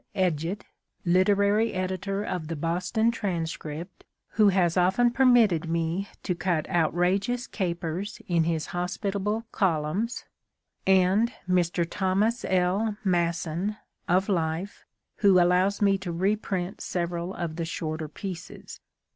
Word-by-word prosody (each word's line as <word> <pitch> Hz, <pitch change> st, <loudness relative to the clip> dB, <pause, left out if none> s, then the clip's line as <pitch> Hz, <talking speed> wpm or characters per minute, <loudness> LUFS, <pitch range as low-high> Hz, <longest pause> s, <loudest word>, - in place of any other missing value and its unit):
Edgett, 180 Hz, 0 st, 0 dB, 0.4 s
literary 200 Hz, +5 st, +3 dB
editor 190 Hz, +2 st, -2 dB
of 180 Hz, -6 st, -4 dB
The 165 Hz, -, -3 dB
Boston 180 Hz, +8 st, 0 dB
Transcript, 170 Hz, -5 st, -4 dB, 0.3 s
who 210 Hz, -2 st, +4 dB
has 180 Hz, -3 st, +2 dB
often 190 Hz, +7 st, +3 dB
permitted 235 Hz, -11 st, +4 dB
me 165 Hz, +4 st, -1 dB, 0.2 s
to 180 Hz, -, 0 dB
cut 170 Hz, -3 st, -1 dB
outrageous 185 Hz, +8 st, +1 dB
capers 175 Hz, +1 st, -3 dB
in 170 Hz, -3 st, +2 dB
his 165 Hz, -2 st, -1 dB
hospitable 200 Hz, +5 st, -2 dB
columns; 185 Hz, +5 st, 0 dB, 0.6 s
and 190 Hz, +5 st, +4 dB, 0.2 s
Mr. 175 Hz, -1 st, +1 dB
Thomas 205 Hz, +6 st, 0 dB
L. 190 Hz, +4 st, +1 dB
Masson, 175 Hz, +2 st, 0 dB, 0.3 s
of 185 Hz, +2 st, +3 dB
Life, 170 Hz, 0 st, -2 dB, 0.3 s
who 195 Hz, -3 st, +5 dB
allows 180 Hz, +4 st, +3 dB
me 195 Hz, -1 st, +3 dB
to 185 Hz, -2 st, -5 dB
reprint 190 Hz, 0 st, -1 dB
several 175 Hz, +1 st, -3 dB
of 170 Hz, -2 st, -4 dB
the 165 Hz, -, -2 dB
shorter 155 Hz, -1 st, -4 dB
pieces. 180 Hz, +3 st, -8 dB
185 Hz, 115 wpm, -27 LUFS, 170-200 Hz, 0.6 s, who